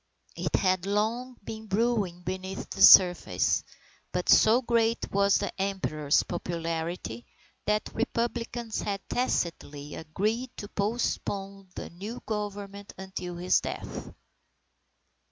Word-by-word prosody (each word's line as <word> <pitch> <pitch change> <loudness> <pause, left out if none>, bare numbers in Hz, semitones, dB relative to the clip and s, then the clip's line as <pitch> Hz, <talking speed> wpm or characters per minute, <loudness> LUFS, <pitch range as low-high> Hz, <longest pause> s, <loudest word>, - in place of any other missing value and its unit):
It - - -1
had 185 -1 +2
long 230 +5 -1
been 220 +1 -7
brewing 200 -4 0
beneath 190 +2 -5
the - - -4
surface, 180 -2 +7 0.5
but - - -2
so 220 +3 +7
great 230 -1 +1
was 200 0 +4
the 200 - -3
Emperor's 155 -7 +1
popularity 165 -7 -4 0.4
that 210 +1 0
Republicans 235 0 -2
had 200 -2 -4
tacitly 150 - -2
agreed 215 +10 -2
to 205 - -6
postpone 200 -3 -2
the - - -6
new 205 +8 -7
Government 205 -1 -5
until 185 -2 -6
his 180 +1 +3
death. - - -6
200 Hz, 110 wpm, -28 LUFS, 180-225 Hz, 0.5 s, surface